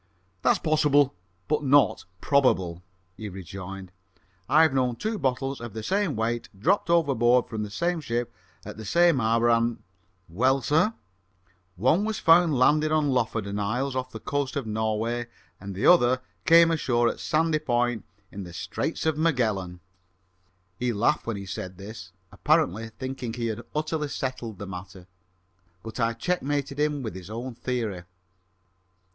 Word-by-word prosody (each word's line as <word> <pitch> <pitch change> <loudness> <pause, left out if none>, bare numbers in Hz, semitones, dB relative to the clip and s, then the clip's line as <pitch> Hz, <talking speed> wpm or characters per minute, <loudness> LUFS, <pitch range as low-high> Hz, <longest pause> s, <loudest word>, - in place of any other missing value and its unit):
"That's - - +3
possible, 145 -3 +3 0.3
but 150 0 0
not 140 0 +3 0.2
probable," 95 -12 +2 0.4
he 110 -1 -6
rejoined. 95 0 -8 0.6
"I've 155 -1 +5
known 125 -2 +1
two 215 - -3
bottles 135 0 -1
of 120 -3 -7
the 110 - -6
same 195 - 0
weight 115 +2 -2
dropped 180 - +1
overboard 125 -7 +3
from 110 -2 -4
the 105 - -4
same 170 +10 -1
ship 120 -3 -3 0.3
at - - -8
the 110 - -7
same 170 - +3
hour, 115 +1 +2
and 115 0 +1 0.2
" 95 +1 -42
"Well, 130 +10 +1
sir?" 160 - +2 0.8
"One 130 - +2
was 220 0 -2
found 165 -3 +5
landed 150 +4 +3
on 155 -2 +2
the - - +1
Lofoden 110 -4 -1
Isles, 125 +6 -1
off 130 0 -2
the 110 - -8
coast 140 +3 -2
of 140 -4 -2
Norway: 110 +2 -1 0.4
the 100 0 -3
other 130 -7 +5 0.3
came 165 0 +7
ashore 120 -7 +1
at - - -2
Sandy 155 0 +1
Point, 120 -4 0 0.3
in 100 - -7
the 85 -2 -10
Straits 155 - -3
of 160 -1 +1
Magellan!" 110 - 0 1.0
He 125 0 0
laughed 115 +7 +1
when 115 -3 -2
he 100 - -7
said 95 -1 -6
this, 100 -2 -9 0.2
apparently 110 +5 +1
thinking 130 0 -6
he 120 -1 -3
had 110 -2 -3
utterly 155 0 -1
settled 130 -6 -4
the 100 - -6
matter, 95 0 -9 0.8
but 110 +2 -8
I 115 0 +1
checkmated 145 -2 -2
him 150 -2 0
with 110 - -4
his 95 0 -9
own 120 +3 -5
theory. 115 -6 -3
125 Hz, 155 wpm, -26 LUFS, 110-150 Hz, 1.0 s, came